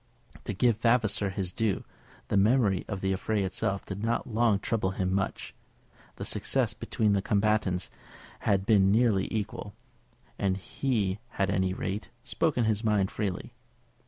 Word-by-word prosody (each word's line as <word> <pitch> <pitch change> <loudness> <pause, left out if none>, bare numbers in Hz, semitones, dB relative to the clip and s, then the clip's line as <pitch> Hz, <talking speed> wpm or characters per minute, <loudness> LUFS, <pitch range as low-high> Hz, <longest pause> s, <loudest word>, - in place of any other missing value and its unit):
To - - -2
give 115 +2 +2
Vavasor 115 -4 +2
his 95 -2 -3
due, 110 -5 0 0.5
the - - 0
memory 105 -2 +3
of 100 -3 -4
the 95 0 +1
affray 105 +2 -1
itself 95 +1 -2
did 100 0 -6
not 115 +1 0
long 115 -2 +2
trouble 105 -1 -1
him 95 0 0
much. 95 0 -2 0.6
The - - -6
success - - +1
between 105 -2 0
the 100 - +2
combatants 105 -3 +1 0.5
had 95 -1 +1
been 100 -3 +5
nearly 110 -3 +2
equal, 110 -3 -4 0.6
and 95 -1 +1
he 100 0 -1
had, 100 -1 0
at - - 0
any 95 0 +1
rate, 95 0 -4
spoken 155 -7 0
his 110 0 +1
mind 105 -3 +2
freely. 95 -4 -3
100 Hz, 155 wpm, -29 LUFS, 95-110 Hz, 0.6 s, been